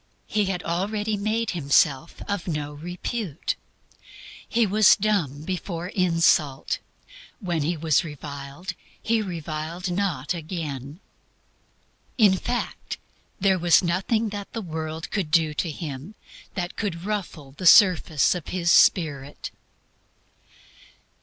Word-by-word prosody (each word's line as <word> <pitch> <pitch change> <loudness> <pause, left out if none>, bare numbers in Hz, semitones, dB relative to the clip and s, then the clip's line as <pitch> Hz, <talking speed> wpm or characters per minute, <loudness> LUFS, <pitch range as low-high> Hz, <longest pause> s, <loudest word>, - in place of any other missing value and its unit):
He 210 -1 +1
had 185 -2 -2
already 205 +5 -1
made 215 +2 -1
Himself 145 -2 +1
of 200 -1 -3
no 150 -3 -3
reputation. 175 - -5 1.1
He 235 -2 +3
was 210 0 +6
dumb 185 -9 0
before 175 0 -4
insult. 165 -7 +2 0.6
When 175 -7 -1
he 165 +4 0
was 155 -2 +2
reviled, 145 +3 -7 0.3
He 225 0 +1
reviled 170 -1 -4
not 175 -7 -1
again. 155 -3 -6 1.2
In 205 -5 +6
fact, 240 +6 -3 0.4
there 190 -1 +3
was 175 +1 +5
NOTHING 195 +6 0
THAT 205 +2 -7
THE 225 -3 -4
WORLD 160 -1 -5
COULD 195 -7 -1
DO 155 -1 +3
TO 165 +3 -1
HIM 155 +4 -6 0.4
that 180 -2 -3
could 180 -4 -3
ruffle 180 -9 -4
the 180 +6 -2
surface 175 - +6
of 180 -4 -6
His 170 -2 +1
spirit. 145 -8 +3
175 Hz, 115 wpm, -25 LUFS, 155-200 Hz, 1.2 s, was